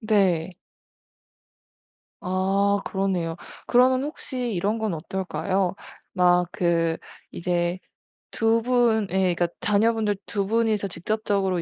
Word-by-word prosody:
네. 190 -6 +2 1.7
아 195 +2 +1
그러네요. 185 -4 -1 0.3
그러면 255 +1 +4
혹시 255 -5 -4
이런 205 +5 0
건 220 -3 -1
어떨까요? 190 +2 -2 0.4
막 180 -1 +3
그 165 -2 +1 0.3
이제 175 +1 -1 0.5
2 225 +1 +2
분의 235 -4 +2 0.3
그러니까 175 0 +1
자녀분들 215 0 +2
2 200 -3 -2
분이서 220 -2 +1
직접적으로 195 -1 -1
195 Hz, 205 characters per minute, -24 LUFS, 180-220 Hz, 1.7 s, 그러면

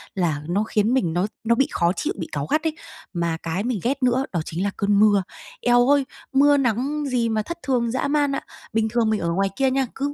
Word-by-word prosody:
là 165 -6 0
nó 195 +5 +1
khiến 220 +2 +1
mình 175 -11 +1
nó 180 +4 +1 0.2
nó 235 +1 +3
bị 275 - +2
khó 170 -1 +2
chịu, - - -2
bị 170 - -4
cáu 145 -1 -2
gắt 305 - 0
ấy. 320 -1 -1 0.4
Mà 170 -2 -1
cái 165 +4 -2
mình 240 -4 -1
ghét 270 +2 -1
nữa 255 +2 +2
đó 175 - -1
chính 170 +3 -3
là 200 - 0
cơn 200 0 +2
mưa. 205 -2 +5 0.4
Eo 245 +1 +4
ơi, 285 -2 +4 0.3
mưa 285 +1 +5
nắng 275 +4 0
gì 240 -3 0
mà 220 -1 0
thất 340 +10 -6
thường 240 -4 0
dã 260 +3 -1
man 290 -1 +2
ạ! - - -3 0.3
Bình 220 0 +1
thường 230 -1 +1
mình 215 - +1
ở 170 0 -1
ngoài 195 +2 +1
kia 265 -1 +2
nha, 270 0 +1
cứ 285 +1 -2
230 Hz, 250 wpm, -23 LUFS, 195-270 Hz, 0.4 s, mưa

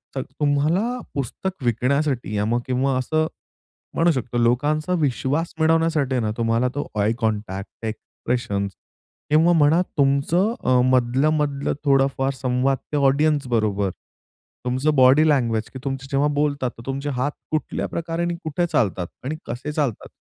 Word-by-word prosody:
तर 135 - -1
तुम्हाला 150 - 0
पुस्तक 145 +6 -4
विकण्यासाठी 125 -1 0
या 105 0 +1
मग 120 +2 +1
किंवा 130 +1 +1
असं 155 +5 0 0.7
म्हणू 170 +1 +3
शकतो 125 -3 -3
लोकांचा 145 +8 +1
विश्वास 145 +3 0
मिळवण्यासाठी 160 -4 +2
आहे 125 - +1
ना 110 - 0
तुम्हाला 115 +1 +1
तो 145 - -3
आय 105 +2 +2
कॉन्टॅक्ट, 105 -3 -3
एक्सप्रेशन्स 110 -2 -3 0.6
किंवा 160 +3 +5
म्हणा 160 +1 +4 0.2
तुमचं 145 +10 +2
अ, 125 0 +4
मधलं, 130 +3 +3
मधलं 140 -2 -1
थोडाफार 135 -1 +2
संवाद 130 +1 0 0.2
ते - - +1
ऑडियन्स 145 +1 +2
बरोबर. 105 -4 +1 0.7
तुमचं 130 +5 +1
बॉडी 130 +4 +6
लँग्वेज 115 -7 +1
की - - -5
तुमची 135 -1 -3
जेव्हा 140 +1 +2
बोलतात 145 -3 0
तर - - -9
तुमचे 140 +2 -3
हात 145 +3 0 0.2
कुठल्या 155 -1 -2
प्रकारे 170 0 -3
आणि 175 0 -1
कुठे 160 +3 0
चालतात? 100 - +1 0.2
आणि 150 +4 -3
कसे 125 +5 -5
चालतात? 145 -7 -2
135 Hz, 145 wpm, -22 LUFS, 125-150 Hz, 0.7 s, बॉडी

